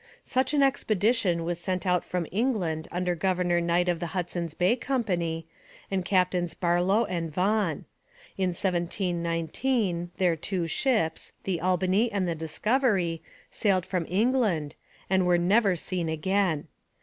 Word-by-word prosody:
Such 260 +3 0
an 285 - +4
expedition 215 -8 +1
was 170 0 -2
sent 185 0 -2
out 180 -2 +2
from 180 -2 -2
England 185 -8 -1
under 180 0 0
Governor 175 0 +1
Knight 170 +1 +1
of 175 -2 +1
the 170 - -3
Hudson's 170 -2 -3
Bay 185 +6 +3
Company, 180 - -1 0.5
and 190 -2 0
Captains 180 -3 +1
Barlow 180 +6 +2
and 170 -4 -3
Vaughan. 185 -1 0 0.5
In 190 -1 0
1719 175 - -1
their 180 -3 +2
two 175 +2 -2
ships, 165 - 0
the 180 -4 -2
Albany 185 +5 +2
and 195 -3 0
the 170 - 0
Discovery, 180 - 0 0.3
sailed 190 -4 +1
from 180 -4 -2
England, 200 - +1 0.3
and 190 -1 +2
were 175 -1 +4
never 195 +3 +3
seen 175 0 -3
again. 165 0 0
180 Hz, 135 wpm, -27 LUFS, 170-200 Hz, 0.5 s, an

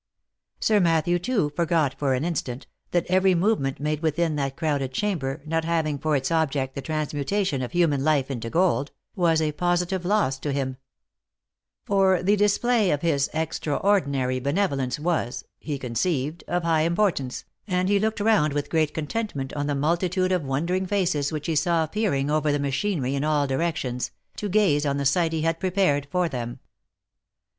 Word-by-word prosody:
Sir 215 -1 +3
Matthew, 170 0 +2
too, 185 -6 0
forgot 165 -4 +1
for 135 -3 +1
an 130 +5 -2
instant, 135 -6 -3 0.2
that 175 -1 +1
every 185 0 +3
movement 170 -7 +1
made 150 +1 -1
within 160 0 0
that 140 -2 -2
crowded 140 -5 -1
chamber, 155 -7 -2
not 165 +1 0
having 160 -3 0
for 155 0 +1
its 135 +1 -1
object 140 -5 0
the 140 - -5
transmutation 155 +2 -1
of 125 - -4
human 160 -6 +2
life 140 -3 +2
into 115 -3 -4
gold, 165 -2 +1 0.3
was 170 -3 +3
a 155 - 0
positive 175 +3 0
loss 180 -9 +1
to 145 - -3
him; 135 -2 -2 1.1
for 190 -3 +3
the 200 +3 +4
display 210 +1 +2
of 145 -1 0
his 145 -4 +1
extraordinary 145 -4 0
benevolence 140 -3 0
was, 155 -6 -1 0.2
he 150 -3 -4
conceived, 140 +5 -2
of 175 0 -1
high 165 -2 +2
importance, 165 -6 0 0.2
and 180 -1 0
he 200 0 +3
looked 220 +1 -1
round 205 -9 +3
with 145 0 -3
great 155 -2 +1
contentment 150 -4 -3
on 145 -1 -2
the 145 - 0
multitude 175 +5 +1
of 180 -2 +2
wondering 170 +8 -1
faces 175 -7 0
which 150 -1 -4
he 165 - -1
saw 165 +2 +2
peering 155 -6 0
over 155 -1 +2
the 145 - +1
machinery 140 0 -1
in 140 0 -1
all 150 -1 +2
directions, 135 -3 -2 0.3
to 205 - -4
gaze 180 -8 +3
on 140 -1 0
the 140 - -2
sight 165 +4 +2
he 160 -1 -1
had 165 0 0
prepared 180 -7 +1
for 180 -1 +1
them. 120 -5 -5
155 Hz, 170 wpm, -25 LUFS, 140-180 Hz, 1.1 s, the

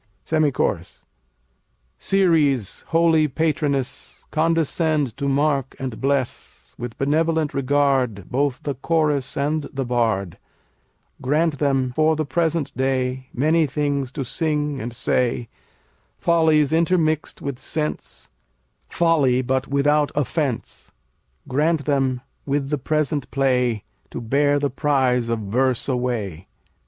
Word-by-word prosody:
SEMI 155 -2 +2
CHORUS - - -2 0.9
Ceres, 155 - +2
holy 165 -2 +3
patroness, 145 -2 -2
Condescend 155 -4 +1
to 140 0 -3
mark 140 -1 +1
and 130 -4 -5
bless, 135 -2 -2
With 120 -1 -6
benevolent 160 +2 +1
regard, 135 -7 +1
Both 135 0 0
the 145 - -2
Chorus 150 0 0
and 150 +2 -1
the 135 -1 -3
Bard; 110 -7 0 0.8
Grant 150 +2 +1
them 135 -3 +1
for 155 0 +3
the 155 0 -1
present 165 +1 -1
day 130 0 -1
Many 155 +4 +2
things 140 -2 -1
to 140 -4 -3
sing 150 -1 -1
and 120 +2 -4
say, 120 0 0 0.7
Follies 160 -3 +3
intermixed 160 -2 +1
with 140 -3 -4
sense; 150 -1 -4 0.6
Folly, 145 -7 +2
but 130 +1 -1
without 145 +1 +2
offense. 145 -2 -2 0.6
Grant 150 +2 +1
them 135 -3 +1 0.3
with 140 0 -1
the 150 - 0
present 150 -1 -1
play 125 -5 +1 0.3
To - - -6
bear 145 +5 +2
the 145 -1 -1
prize 130 -4 +1
of 115 -1 -1
verse 125 +4 0
away. 120 - -2
140 Hz, 115 wpm, -22 LUFS, 130-155 Hz, 0.9 s, holy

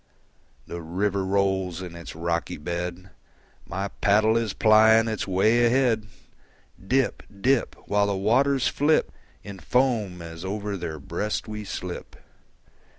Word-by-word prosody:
The 85 - -6
river 95 +4 -1
rolls 95 -2 0
in 85 -2 -8
its 85 -2 -9
rocky 85 -2 -2
bed; 85 +4 -5 0.6
My 95 +3 -3
paddle 110 +3 +2
is 115 -2 0
plying 110 +1 +5
its 110 -3 -2
way 110 +6 +3
ahead; 120 -3 +2 0.8
Dip, 130 +6 +1 0.2
dip, 130 +3 +1
While 100 0 +2
the 100 -1 -1
waters 130 +6 +2
flip 150 +2 +2 0.3
In 100 -2 -9
foam 115 -9 0
as 85 0 -8
over 100 +1 -3
their 85 -4 -5
breast 105 +11 -3
we 105 0 -5
slip. 90 -3 -6
100 Hz, 130 wpm, -25 LUFS, 90-110 Hz, 0.8 s, plying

